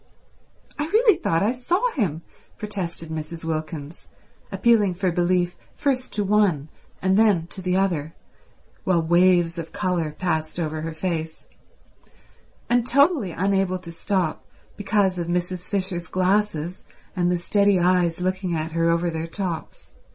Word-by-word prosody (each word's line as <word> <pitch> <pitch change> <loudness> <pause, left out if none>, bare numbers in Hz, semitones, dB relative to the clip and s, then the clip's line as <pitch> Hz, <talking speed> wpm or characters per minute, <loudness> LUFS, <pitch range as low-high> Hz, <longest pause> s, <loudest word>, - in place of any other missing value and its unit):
"I 295 - 0
really 435 +2 +5
thought 165 - 0
I 215 - +3
saw 355 - 0
him," 170 - -1 0.3
protested 180 -6 -5
Mrs. 160 +1 -5
Wilkins, 155 -1 -5 0.4
appealing 215 -6 +3
for 185 0 0
belief 175 0 +1 0.2
first 260 -3 -1
to 205 - 0
one 195 -8 +2 0.3
and 190 +1 +3
then 205 -7 +4
to 190 - -6
the 180 0 0
other 165 -5 0 0.7
while 175 -3 +2
waves 175 0 +3
of 165 -1 -6
colour 175 -4 -1
passed 160 -2 -2
over 155 -1 -2
her 160 0 -5
face, 160 -2 -3 1.2
and 240 0 +3
totally 280 - +4
unable 190 +1 0
to 180 -2 -10
stop 175 -1 -1 0.3
because 195 -3 +1
of 170 - -3
Mrs. 180 +1 -2
Fisher's 185 -4 -2
glasses 185 -2 0 0.3
and 175 -1 +1
the 180 - +1
steady 200 +2 +3
eyes 180 -1 +2
looking 185 -1 -1
at 160 0 -3
her 165 +1 +1
over 170 +1 +1
their 160 0 -4
tops. 175 -2 -5
180 Hz, 145 wpm, -23 LUFS, 165-200 Hz, 1.2 s, really